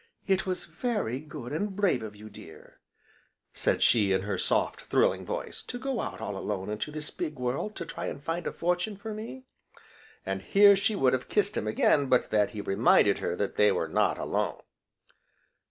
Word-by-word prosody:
"It 190 -1 +1
was 185 -1 -2
very 210 - -2
good, 140 -5 -8
and 195 +5 -2
brave 195 -10 +2
of 105 -1 -7
you, 105 +1 -11
dear," - - -14 0.7
said - - +1
she 105 -4 +4
in 95 0 +2
her 100 -1 -2
soft, - - 0
thrilling - - +1
voice, - - -4
"to 245 - -5
go 260 -1 -2
out - - -5
all 105 -2 -4
alone 95 0 -3
into 105 +7 -3
this 150 0 -6
big 155 - -4
world 125 +12 -2
to 170 - -5
try - - -5
and - - -5
find 165 +2 -2
a - - -1
fortune 180 +4 -1
for 220 +2 -6
me!" 230 +5 -8 0.8
and 95 0 -2
here 200 - +6
she 200 +2 +1
would 130 -9 +3
have 130 -1 -2
kissed 205 -1 +1
him 105 - -2
again 140 +6 +3
but 125 -1 +2
that 105 -1 +3
he 105 - -6
reminded 100 0 +4
her 85 - -2
that 100 +2 -3
they 105 - +5
were - - -1
not - - +1
alone. - - -2
145 Hz, 195 wpm, -28 LUFS, -, 0.8 s, here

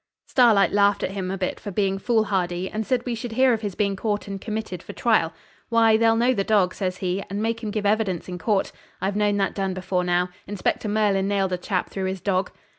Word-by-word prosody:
Starlight 220 -7 +4
laughed 205 0 +3
at - - -1
him 190 -2 -4
a 195 - -2
bit 185 -1 -2
for - - -6
being 195 0 0
foolhardy, 190 -6 0
and 215 +1 -4
said 250 -2 0
we 245 - -2
should 230 0 -5
hear 260 +1 +4
of 220 - -2
his 205 -4 -4
being 200 -2 0
caught 205 +1 -2
and 195 -1 -5
committed 215 -5 -4
for - - -9
trial. 215 -9 +2 0.4
'Why, 225 -1 +5
they'll 225 0 +4
know 240 +3 +3
the 200 - 0
dog,' 195 -3 +2
says 185 -2 -3
he, 185 +1 -2
'and 200 +2 -3
make 225 +1 -1
him 220 - -3
give 210 0 -3
evidence 205 -4 0
in 180 -1 -6
court. 200 +2 0 0.3
I've 195 +1 -1
known 205 -1 +2
that 195 -1 0
done 195 -2 -2
before 185 -1 -1
now. 180 0 +1 0.2
Inspector 205 +2 -1
Merlin 205 -2 +2
nailed 195 -2 0
a - - 0
chap 185 0 -2
through 190 -1 -3
his 190 0 -2
dog.' 190 0 0
200 Hz, 235 wpm, -24 LUFS, 190-220 Hz, 0.4 s, Why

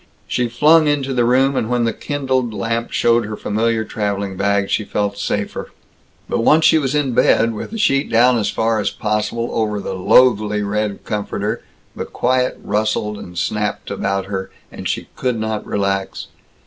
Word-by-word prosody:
She 120 -1 0
flung 155 +6 +5
into 140 -2 0
the 120 -2 +2
room, 135 +3 +3
and 115 - -1
when 120 -1 +1
the 115 -1 0
kindled 130 -5 -2
lamp 115 +3 -2
showed 120 0 +3
her 105 -1 -5
familiar 110 +1 0
traveling 100 -2 -3
bag, 100 0 0
she 110 - +1
felt 100 0 -2
safer. 100 0 -3 0.6
But - - -1
once 155 +7 +4
she 160 - +6
was 140 -1 -1
in 145 -3 +1
bed, 115 0 +3
with 105 - -6
the 225 - -6
sheet 140 -10 +2
down 120 +1 +4
as 105 - 0
far 115 0 0
as 100 - 0
possible 105 +2 -2
over 105 -2 0
the 100 - -4
loathly 105 +1 +3
red 105 0 -2
comforter, 105 -1 -3 0.3
the - - -4
quiet 125 +1 0
rustled 105 0 -1
and 90 0 -10
snapped 105 +4 -2
about 100 -1 -1
her, 95 -1 -4 0.2
and - - -5
she - - -3
could 125 -2 -1
not 110 -1 -2
relax. 100 -1 -2
110 Hz, 175 wpm, -19 LUFS, 105-125 Hz, 0.6 s, she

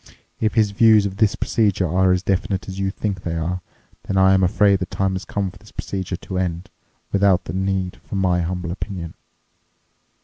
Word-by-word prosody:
If 110 - 0
his 110 -3 +3
views 110 0 +5
of 95 -1 -4
this 110 -2 +3
procedure 100 -5 +1
are 95 +3 +3
as 90 0 +1
definite 95 0 -1
as 95 0 -6
you 95 0 0
think 95 -2 -3
they 85 -2 -3
are, 85 +3 -2 0.5
then 95 - -1
I'm 95 0 +5
afraid 100 +2 +3
the 90 - -3
time 95 0 -1
has 95 +1 -4
come 100 -2 -2
for 100 - -17
this 105 - -17
procedure 95 -2 -4
to 90 +1 -5
end, 90 -1 -3 0.4
without 100 -2 +3
any 90 +4 -2
need 95 -1 -1
for - - -9
my 90 -2 +2
humble 90 0 -3
opinion." 90 -3 -5
95 Hz, 195 wpm, -21 LUFS, 90-100 Hz, 0.5 s, views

